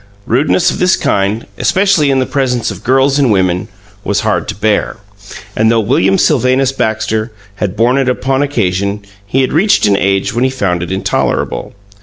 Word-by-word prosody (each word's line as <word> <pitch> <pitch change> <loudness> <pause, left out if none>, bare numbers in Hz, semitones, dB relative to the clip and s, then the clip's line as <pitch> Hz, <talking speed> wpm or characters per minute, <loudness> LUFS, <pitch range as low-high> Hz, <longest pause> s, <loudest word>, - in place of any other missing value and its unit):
Rudeness 140 +8 +2
of - - -5
this 185 +1 +3
kind, 100 +3 -1
especially 190 -6 +2
in 135 - +2
the 130 - +1
presence 125 -5 -1
of 100 +1 -10
girls 135 +2 +2
and 135 -5 +2
women, 95 -2 0 0.4
was 100 -1 -1
hard - - -1
to - - -4
bear, 105 +1 -1 0.6
and 110 +1 +2
though 115 0 +3
William 95 -4 +2
Sylvanus 130 -2 +2
Baxter 110 -2 -2 0.3
had 100 -1 -3
borne 120 +4 +2
it 130 -1 +1
upon 135 +2 0
occasion, 100 -7 -1 0.2
he 135 +6 +1
had 130 - -1
reached 195 +7 +3
an 100 -1 +3
age 95 0 0
when 120 +2 0
he 130 - +2
found 95 -9 -2
it 85 - -5
intolerable. 95 +1 -2
115 Hz, 180 wpm, -13 LUFS, 100-135 Hz, 0.6 s, this